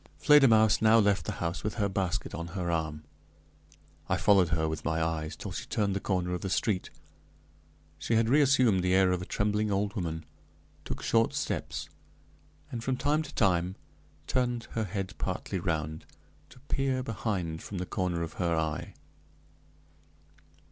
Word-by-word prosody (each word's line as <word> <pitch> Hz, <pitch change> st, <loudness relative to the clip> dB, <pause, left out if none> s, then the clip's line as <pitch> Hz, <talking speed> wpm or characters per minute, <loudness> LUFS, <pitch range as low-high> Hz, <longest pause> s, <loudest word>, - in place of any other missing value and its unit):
Fledermausse 115 Hz, -8 st, +6 dB
now 110 Hz, +1 st, +6 dB
left 100 Hz, -2 st, +2 dB
the -, -, -1 dB
house 85 Hz, +2 st, -3 dB
with 105 Hz, -, -2 dB
her 105 Hz, -3 st, +1 dB
basket 95 Hz, -2 st, -2 dB
on 85 Hz, +2 st, -4 dB
her 90 Hz, -2 st, -1 dB
arm. 80 Hz, -2 st, -2 dB, 1.1 s
I -, -, +2 dB
followed 95 Hz, -5 st, +4 dB
her 80 Hz, -1 st, +1 dB
with 80 Hz, -1 st, -4 dB
my 80 Hz, 0 st, 0 dB
eyes 80 Hz, -1 st, -2 dB
till -, -, -7 dB
she -, -, -5 dB
turned 100 Hz, -2 st, 0 dB
the -, -, 0 dB
corner 90 Hz, -2 st, -1 dB
of 90 Hz, -, -3 dB
the 95 Hz, -, -3 dB
street. 95 Hz, 0 st, 0 dB, 1.1 s
She 115 Hz, +9 st, 0 dB
had 110 Hz, 0 st, +3 dB
reassumed 130 Hz, -7 st, +4 dB
the 90 Hz, +1 st, +2 dB
air 95 Hz, -1 st, +4 dB
of 90 Hz, -1 st, 0 dB
a 90 Hz, -, -7 dB
trembling 105 Hz, +1 st, 0 dB
old 100 Hz, +1 st, 0 dB
woman, 80 Hz, -5 st, -4 dB, 0.6 s
took -, -, -5 dB
short 115 Hz, 0 st, +2 dB
steps, -, -, -3 dB, 0.8 s
and 115 Hz, -3 st, -4 dB
from 130 Hz, 0 st, -1 dB
time 145 Hz, +4 st, +1 dB
to 155 Hz, -, -9 dB
time 90 Hz, -3 st, +2 dB, 0.5 s
turned 120 Hz, +3 st, 0 dB
her 110 Hz, -1 st, -1 dB
head 95 Hz, 0 st, -4 dB
partly 95 Hz, -, -3 dB
around, 80 Hz, -3 st, -3 dB, 0.4 s
to -, -, -16 dB
peer 135 Hz, -2 st, -1 dB
behind 95 Hz, -8 st, -3 dB
from 100 Hz, -, -7 dB
the 90 Hz, -, -2 dB
corner 90 Hz, -2 st, -1 dB
of 80 Hz, -, -6 dB
her 85 Hz, -1 st, +1 dB
eye. 80 Hz, -1 st, -2 dB
95 Hz, 165 wpm, -29 LUFS, 85-110 Hz, 1.1 s, Fledermausse